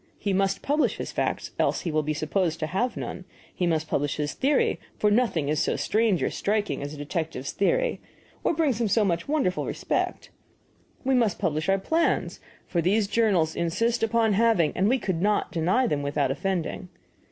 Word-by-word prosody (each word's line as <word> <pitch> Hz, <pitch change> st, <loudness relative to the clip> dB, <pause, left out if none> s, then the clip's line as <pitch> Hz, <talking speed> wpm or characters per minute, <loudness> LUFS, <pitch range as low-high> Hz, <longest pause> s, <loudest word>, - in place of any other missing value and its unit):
He 200 Hz, -, -1 dB
must 195 Hz, 0 st, 0 dB
publish 295 Hz, +2 st, +1 dB
his -, -, -5 dB
facts, -, -, -2 dB
else -, -, +1 dB
he 170 Hz, -, -3 dB
will 155 Hz, 0 st, +2 dB
be 155 Hz, 0 st, -2 dB
supposed 160 Hz, +2 st, -1 dB
to -, -, +1 dB
have 195 Hz, +10 st, -1 dB
none; -, -, -5 dB, 0.3 s
he 180 Hz, -, -1 dB
must 160 Hz, -2 st, 0 dB
publish 145 Hz, -1 st, -1 dB
his 150 Hz, 0 st, -2 dB
theory, 280 Hz, +2 st, +1 dB, 0.2 s
for 210 Hz, -, +2 dB
nothing 205 Hz, -, +2 dB
is 150 Hz, +1 st, +1 dB
so -, -, +1 dB
strange 215 Hz, -4 st, +1 dB
or -, -, 0 dB
striking 210 Hz, -4 st, -1 dB
as 145 Hz, 0 st, -5 dB
a 150 Hz, -, -8 dB
detective's 145 Hz, -2 st, -3 dB
theory, -, -, 0 dB, 0.4 s
or -, -, +1 dB
brings 285 Hz, -8 st, +1 dB
him 230 Hz, -, +2 dB
so 210 Hz, +1 st, +3 dB
much 170 Hz, -3 st, -1 dB
wondering 280 Hz, -12 st, 0 dB
respect; -, -, -2 dB, 0.7 s
we 265 Hz, 0 st, +1 dB
must 230 Hz, -6 st, +2 dB
publish 155 Hz, +2 st, -1 dB
our 195 Hz, -, +4 dB
plans, 320 Hz, -, 0 dB, 0.3 s
for 170 Hz, -, -1 dB
these 200 Hz, +5 st, +2 dB
the 200 Hz, -, -15 dB
journals 195 Hz, -9 st, +2 dB
insist 225 Hz, +8 st, 0 dB
upon 225 Hz, -1 st, +2 dB
having, 210 Hz, -7 st, +3 dB
and 195 Hz, +3 st, +2 dB
we 260 Hz, -, +3 dB
could 190 Hz, -8 st, -2 dB
not 210 Hz, +1 st, +1 dB
deny 185 Hz, +9 st, +2 dB
them 150 Hz, -11 st, 0 dB
without 140 Hz, -1 st, 0 dB
offending. 185 Hz, +3 st, -3 dB
195 Hz, 195 wpm, -26 LUFS, 160-230 Hz, 0.7 s, our